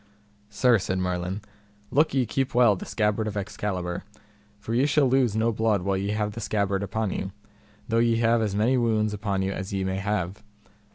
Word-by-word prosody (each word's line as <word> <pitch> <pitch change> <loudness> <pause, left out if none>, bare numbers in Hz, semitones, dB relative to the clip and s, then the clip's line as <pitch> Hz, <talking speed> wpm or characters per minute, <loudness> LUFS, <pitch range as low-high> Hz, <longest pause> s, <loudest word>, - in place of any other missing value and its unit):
Sir, 115 +2 +3
said 95 0 -2
Merlin, 90 +2 -2 0.5
look 150 +1 +3
ye 130 -2 +3
keep 130 +3 -2
well 120 -4 +6
the - - -8
scabbard 105 0 0
of 105 -1 -4
Excalibur, 95 -3 -3 0.5
for 110 +2 -5
ye 130 +4 +3
shall 145 -2 +3
lose 125 -4 +2
no 115 +1 +2
blood 110 -3 +1
while 100 0 0
ye 100 +1 -2
have 105 0 -1
the 115 +2 -7
scabbard 100 -2 0
upon 100 +1 -2
you, 95 - -3 0.6
though 115 - +2
ye 115 0 +3
have 115 0 +3
as 105 -3 -1
many 115 +5 +2
wounds 110 -3 +1
upon 100 -2 -1
you 95 - -1
as 95 0 -5
ye 95 -1 -1
may 95 0 -1
have. 100 -1 -2
105 Hz, 195 wpm, -26 LUFS, 95-115 Hz, 0.6 s, well